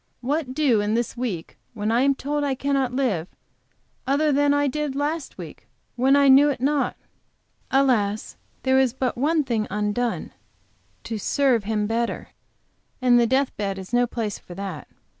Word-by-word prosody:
What, 265 0 -2
do 265 -9 +3
in 210 +1 0
this 235 0 -1
week, 225 -10 -5 0.2
when 210 0 -1
I 235 +2 +3
am 275 +1 +3
told 290 +2 -2
I 275 -2 0
cannot 275 -2 0
live, 240 -11 -1 0.8
other 295 +3 +2
than 285 +1 +3
I 285 0 +2
did 295 0 -2
last 295 +2 -3
week, - - -10 0.3
when 260 +3 +3 0.2
knew 285 +2 +6
it 280 - -2
not? 280 +2 0 0.7
Alas, 230 -7 +1 0.3
there 265 0 +3
is 260 -3 +2
but 255 -2 -2
one 300 +5 +1
thing 225 -5 -1
undone, 210 +4 -2 0.7
to 225 -2 -4
serve 250 -2 +1
Him 210 -1 0
better; 230 +2 -2 0.7
and 250 -2 +4
the 235 - +3
death 265 +3 +1
bed 195 -2 -2
is 190 +4 -9
no 245 0 +3
place 225 -4 -4
for 175 - -12
that. 190 -5 -6
255 Hz, 165 wpm, -23 LUFS, 220-280 Hz, 0.8 s, knew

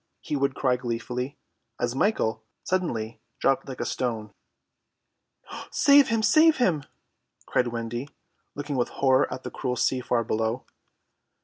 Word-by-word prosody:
he - - -4
would 140 -1 0
cry 130 -2 +2
gleefully, 125 +2 -4 0.4
as 120 0 0
Michael 120 - +1 0.2
suddenly 115 -13 -2 0.2
dropped 135 +1 +1
like 130 - -7
a - - -1
stone. 110 -4 -3 1.4
"Save 280 -1 +6
him, 225 -1 +1
save 315 +9 +6
him!" 170 - +1 0.6
cried 125 - +1
Wendy, 120 +3 -4 0.5
looking 145 -1 -3
with 120 - +1
horror 130 0 +2
at 130 - -5
the - - -6
cruel 125 -2 -2
sea 125 +1 +1
far 120 -1 +1
below. 110 +3 -1
130 Hz, 135 wpm, -26 LUFS, 120-145 Hz, 1.4 s, Save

